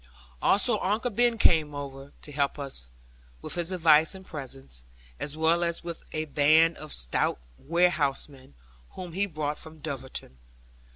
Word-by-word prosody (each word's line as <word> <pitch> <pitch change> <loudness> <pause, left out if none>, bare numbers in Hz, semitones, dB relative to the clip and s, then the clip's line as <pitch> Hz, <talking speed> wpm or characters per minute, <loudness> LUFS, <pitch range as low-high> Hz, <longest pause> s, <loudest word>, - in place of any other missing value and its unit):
Also 210 +2 +3
Uncle 215 +6 0
Ben 240 +1 +2
came 155 -7 +3
over 140 0 -7
to 150 - -9
help 140 0 0
us 135 - -6 0.5
with - - -2
his 175 +1 -1
advice 160 -1 +4
and 190 0 -11
presence, 135 - -8 0.4
as 150 +1 -4
well 165 +2 +3
as 170 0 -1
with 170 -1 -6
a 155 0 -2
band 155 +3 +4
of 155 -1 -9
stout - - 0 0.2
warehousemen, 145 - +1 0.4
whom 180 -2 -7
he 200 +3 0
brought 150 -4 -2
from 160 0 -5
Dulverton. 135 - -6
155 Hz, 150 wpm, -28 LUFS, 140-175 Hz, 0.5 s, advice